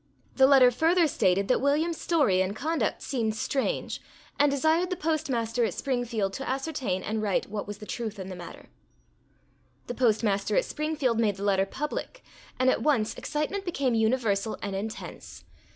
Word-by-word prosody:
The 265 0 +6
letter 265 -3 +7
further 330 +7 +3
stated 195 -8 +1
that 250 - +2
William's 305 +4 +1
story 275 - +3
and 190 +2 -1
conduct 315 +7 -1
seemed 225 -5 -1
strange, 275 - -2 0.4
and 290 0 +5
desired 315 +5 +2
the 365 - -1
Postmaster 255 -9 -1
at 215 -6 -1
Springfield 235 -7 -1
to 270 +5 -5
ascertain 265 - -2
and 220 0 -2
write 200 -1 -1
what 210 -2 -4
was 205 0 -6
the 210 - -10
truth 220 -1 -4
in 190 -1 -6
the 190 - -6
matter. 175 - -11 1.2
The - - -4
Postmaster 215 -5 +1
at - - +3
Springfield 300 -6 -1
made 210 -3 +2
the 195 - -7
letter 195 -1 +2
public, 300 - -5 0.4
and 255 - +2
at 255 - +3
once, 250 -8 +2
excitement 305 +7 -3
became 280 -9 0
universal 220 -2 +1
and 200 -1 -3
intense. 215 +3 -7
245 Hz, 170 wpm, -27 LUFS, 210-295 Hz, 1.2 s, letter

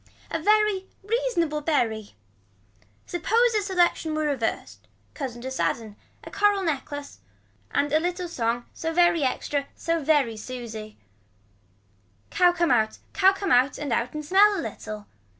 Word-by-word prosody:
A 325 - -1
very 420 0 +2 0.2
reasonable 400 -9 0
berry. 225 - -1 0.9
Suppose 455 +8 +2
a 425 - +2
selection 350 -5 +1
were 310 - 0
reverse. 270 -7 -2 0.3
Cousin 245 -5 -6
to 260 - -4
sadden. 225 -4 -2 0.3
A - - -10
coral 405 -1 +2
neck 305 -6 -1 0.8
and 285 - 0
a 310 - +5
little 355 +2 -2
song 240 -6 -2
so 325 - -3
very 340 -1 +3
extra 280 +1 -1
so 330 -2 -1
very 275 -7 +2
Susie. 220 -2 -7 1.3
Cow 355 -1 +5
come 345 -3 +1
out 220 -3 +2 0.2
cow 385 0 +5
come 390 0 -3
out 255 +3 +4
and 285 -5 -2
out 240 +4 -1
and 305 0 -4
smell 400 +5 +5
a - - -3
little. 215 -1 -8
310 Hz, 145 wpm, -25 LUFS, 245-365 Hz, 1.3 s, a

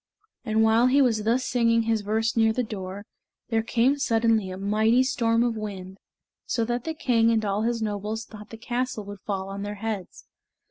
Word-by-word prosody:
And 220 -2 +2
while 225 +2 +4
he 270 +3 +4
was 225 -6 +2
thus 245 +3 +1
singing 230 -2 +2
his 225 -1 0
verse 220 +2 -1
near 225 -1 +4
the 250 +3 -1
door, 200 -2 -6 0.4
there 225 -1 +1
came 245 +5 +1
suddenly 225 -6 +2
a 185 - -6
mighty 215 +5 +2
storm 230 -3 +1
of 240 -2 0
wind, 195 -3 -7 0.5
so 230 -2 0
that 240 +1 -3
the 320 0 -3
king 235 -7 +2
and 220 -2 +1
all 200 +1 0
his 230 0 -1
nobles 210 +1 -3
thought 210 -1 -12
the 225 - -9
castle 240 -1 -3
would 205 0 -9
fall 195 -2 -2
on 200 0 -6
their 205 +1 -4
heads. 210 -2 -5
225 Hz, 195 wpm, -25 LUFS, 210-235 Hz, 0.5 s, while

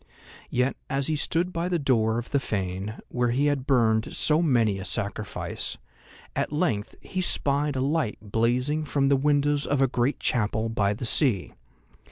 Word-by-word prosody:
Yet, 125 +2 0
as 135 0 0
he 155 - +1
stood 170 +4 0
by 170 +2 -1
the 175 - +1
door 115 -6 +2
of 120 - -5
the 140 - +3
fane, 100 -2 -3
where 125 -1 0
he 130 +5 +1
had 145 -3 0
burned 110 -4 +2
so 155 +2 +2
many 115 - +2
a - - -5
sacrifice, 100 +2 -4 0.6
at - - -1
length 150 - -1
he 185 - -3
spied 145 -4 0
a 130 - 0
light 140 -4 0
blazing 120 +8 0
from 140 -2 +1
the 140 - +5
windows 145 +1 +2
of 145 - +1
a 135 - +5
great 125 +3 0
chapel 110 -1 0
by 105 -2 +1
the 120 - -5
sea. 115 - +1
130 Hz, 175 wpm, -26 LUFS, 110-145 Hz, 0.6 s, the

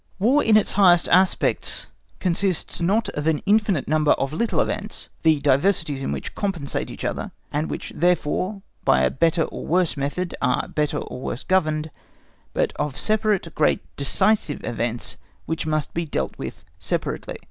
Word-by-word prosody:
War 250 +9 +3
in 220 -1 +5
its 215 - +2
highest 180 -4 +5
aspects 185 +1 +2 0.3
consists 185 -1 0
not 205 +6 +2
of 150 +1 -3
an 160 -2 +1
infinite 200 - +2
number 155 0 +4
of 135 +2 -2
little 230 +8 0
events, 210 +1 -2
the 160 -2 +4
diversities 145 0 +2
in - - -2
which - - -5
compensate 175 -9 -2
each - - -7
other, - - -2 0.2
and 150 +2 -1
which - - -5
therefore 180 +3 0 0.2
by 65 -1 +4
a 65 - +3
better 165 +2 +2
or - - -6
worse 175 0 +1
method 145 +6 -2
are 125 -2 +1
better 150 -1 -1
or 125 - -6
worse 125 - -4
governed, 155 -4 +1 0.6
but - - 0
of 145 -2 -2
separate 215 -5 0
great 155 - +2
decisive 145 +4 +1
events 120 0 -3 0.3
which 160 -1 -3
must 155 -2 -1
be 170 - -1
dealt - - -2
with - - -7 0.2
separately. - - -3
165 Hz, 160 wpm, -23 LUFS, 150-195 Hz, 0.6 s, in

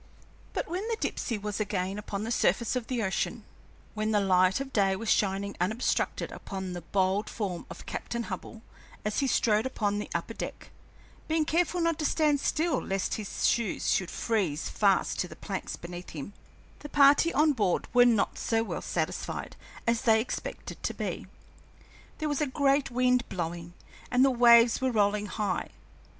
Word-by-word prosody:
But - - -2
when 360 +3 -3
the 460 -1 -1
Dipsey 230 - -2
was 210 0 -4
again 200 -1 -2
upon 205 -1 -4
the 225 - -3
surface 235 0 +2
of 250 -2 -2
the 245 -3 -1
ocean, 190 -1 -2 0.5
when 215 0 -1
the 210 -1 +3
light 185 +1 +3
of 270 0 -6
day 195 -2 +3
was 225 +3 -1
shining 200 0 +1
unobstructed 220 +7 0
upon 190 -2 -6
the 175 - -5
bold 190 +4 0
form 190 -6 -4
of - - -10
Captain 235 0 -4
Hubbell 220 +2 -7 0.4
as 210 - 0
he 275 - +1
strode 220 -1 +2
upon 205 -5 -1
the 210 - -5
upper - - -2
deck - - -7 0.6
being 315 -1 +1
careful 350 +3 +1
not 335 -2 +1
to 305 - -1
stand 300 -2 +2
still 315 0 0
lest 195 0 -1
his 210 -3 -3
shoes 235 -5 +1
should 185 -2 +1
freeze 190 -10 -1
fast 200 -3 +2
to 180 - 0
the - - -11
planks 195 -2 -5
beneath 175 +1 -8
him 160 +6 -7 0.5
the 295 - -9
party 290 +4 +5
on 305 0 +4
board 205 -8 0
were 245 0 +7
not 235 -4 +2
so 225 -1 +1
well - - -4
satisfied - - -3 0.3
as 230 0 +1
they 220 -2 +4
expected 230 - -5
to - - -2
be. - - -4 0.9
There 310 - -2
was 290 0 -1
a 300 - +2
great 275 +1 +2
wind 250 0 +2
blowing, 170 -1 -4 0.3
and 250 +1 +4
the 270 - +4
waves 235 -1 +6
were 260 - +2
rolling 210 -1 +1
high. 210 -1 -2
220 Hz, 175 wpm, -29 LUFS, 195-260 Hz, 0.9 s, were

